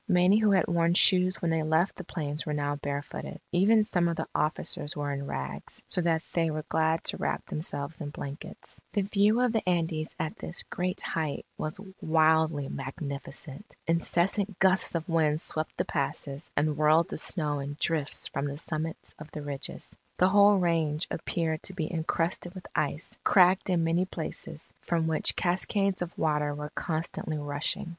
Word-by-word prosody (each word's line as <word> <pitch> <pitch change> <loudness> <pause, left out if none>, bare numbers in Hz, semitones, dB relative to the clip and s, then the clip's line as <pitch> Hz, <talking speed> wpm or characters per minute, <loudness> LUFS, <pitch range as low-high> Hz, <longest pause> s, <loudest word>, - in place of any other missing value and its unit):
Many 180 +3 +5
who 215 -1 +4
had 190 -4 +4
worn 170 0 +2
shoes 185 -1 +5
when 165 - +2
they 160 -1 +1
left 160 +4 +2
the 185 - -7
plains, 150 -3 -3
were 150 -2 -2
now 145 0 -1
barefooted. 145 0 -5
Even 205 +5 +5
some 175 -4 +2
of 170 - 0
the - - -3
officers 150 -1 -1
were 145 -1 -2
in 140 0 -4
rags, 70 - -5
so 180 - +2
that 165 -1 +1
they 165 -1 +2
were 155 0 -3
glad 160 0 +1
to - - -1
wrap - - -2
themselves 155 0 -4
in 145 - -4
blankets. 145 0 -8
The 205 - +2
view 205 +4 +3
of 250 -2 +3
the 220 - +2
Andes 160 -3 0
at 155 - -3
this 175 - -5
great 180 +1 -1
height 155 -3 -2
was 155 +4 -3 0.2
wildly 160 -2 +3
magnificent. 140 - -6
Incessant 180 +4 +1
gusts 190 -2 +4
of 165 -1 -2
wind 155 -3 +2
swept 155 -1 -1
the - - 0
passes, 140 +1 -3
and 150 +1 +2
whirled 155 +2 +4
the - - -4
snow 150 -4 0
in 140 +1 -5
drifts 155 -4 0
from 140 -1 -2
the 140 0 -4
summits 160 0 -4
of 155 0 -9
the 150 - -7
ridges. 140 -2 -5 0.2
The 185 - +5
whole 205 +1 +6
range 165 -3 +1
appeared 160 -1 -1
to 190 - -5
be 165 -2 -3
encrusted 170 +2 -1
with 185 - -9
ice, 150 +1 -1
cracked 185 0 +5
in 175 -2 +2
many 165 +3 +2
places, 160 -2 -6
from 165 -2 0
which 160 -1 +3
cascades 190 +2 +1
of 175 -1 -4
water 150 -2 +1
were 150 0 -6
constantly 160 -1 -3
rushing. 145 +3 -2
160 Hz, 180 wpm, -29 LUFS, 150-180 Hz, 0.2 s, whole